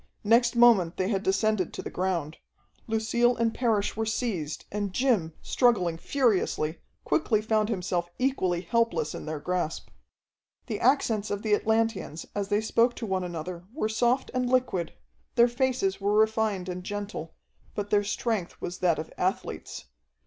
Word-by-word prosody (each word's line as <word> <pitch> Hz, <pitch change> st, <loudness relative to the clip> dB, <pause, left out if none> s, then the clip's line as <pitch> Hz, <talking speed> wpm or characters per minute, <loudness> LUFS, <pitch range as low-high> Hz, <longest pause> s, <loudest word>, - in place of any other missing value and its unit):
Next 235 Hz, +3 st, +4 dB
moment 230 Hz, -8 st, +5 dB
they 185 Hz, +1 st, 0 dB
had 195 Hz, -3 st, 0 dB
descended 195 Hz, -1 st, +1 dB
to -, -, -6 dB
the -, -, -6 dB
ground. 175 Hz, -5 st, -2 dB, 0.5 s
Lucille 230 Hz, +2 st, +2 dB
and 230 Hz, -1 st, +1 dB
Parrish 220 Hz, -5 st, 0 dB
were 225 Hz, -, -1 dB
seized, 185 Hz, -, -2 dB
and 205 Hz, -1 st, -2 dB
Jim, 215 Hz, -10 st, +1 dB
struggling 205 Hz, -10 st, +2 dB
furiously, 190 Hz, -, +1 dB, 0.2 s
quickly 155 Hz, +8 st, +2 dB
found 215 Hz, 0 st, +1 dB
himself 180 Hz, -4 st, -1 dB
equally 190 Hz, -10 st, 0 dB
helpless 230 Hz, -4 st, 0 dB
in -, -, -7 dB
their 155 Hz, -1 st, -3 dB
grasp. 175 Hz, 0 st, -2 dB, 0.8 s
The 215 Hz, -3 st, -4 dB
accents 230 Hz, -5 st, +2 dB
of 205 Hz, 0 st, -3 dB
the 215 Hz, -2 st, +1 dB
Atlanteans 220 Hz, -7 st, 0 dB
as 200 Hz, -1 st, -2 dB
they 205 Hz, +1 st, +1 dB
spoke 230 Hz, +2 st, +2 dB
to 230 Hz, -, -5 dB
one 190 Hz, -3 st, -1 dB
another 175 Hz, 0 st, -6 dB
were 245 Hz, -4 st, -1 dB
soft 240 Hz, +4 st, +1 dB
and 250 Hz, -1 st, 0 dB
liquid, 255 Hz, -9 st, +1 dB, 0.4 s
their 235 Hz, 0 st, +6 dB
faces 245 Hz, -6 st, 0 dB
were 205 Hz, +1 st, +2 dB
refined 220 Hz, -3 st, +2 dB
and 180 Hz, 0 st, -5 dB
gentle, 205 Hz, -5 st, -5 dB, 0.4 s
but 205 Hz, 0 st, -4 dB
their 205 Hz, 0 st, +4 dB
strength 205 Hz, -3 st, -2 dB
was 175 Hz, -, -5 dB
that 175 Hz, -3 st, +2 dB
of 155 Hz, -, -6 dB
athletes. 185 Hz, -, -3 dB
205 Hz, 155 wpm, -27 LUFS, 180-230 Hz, 0.8 s, their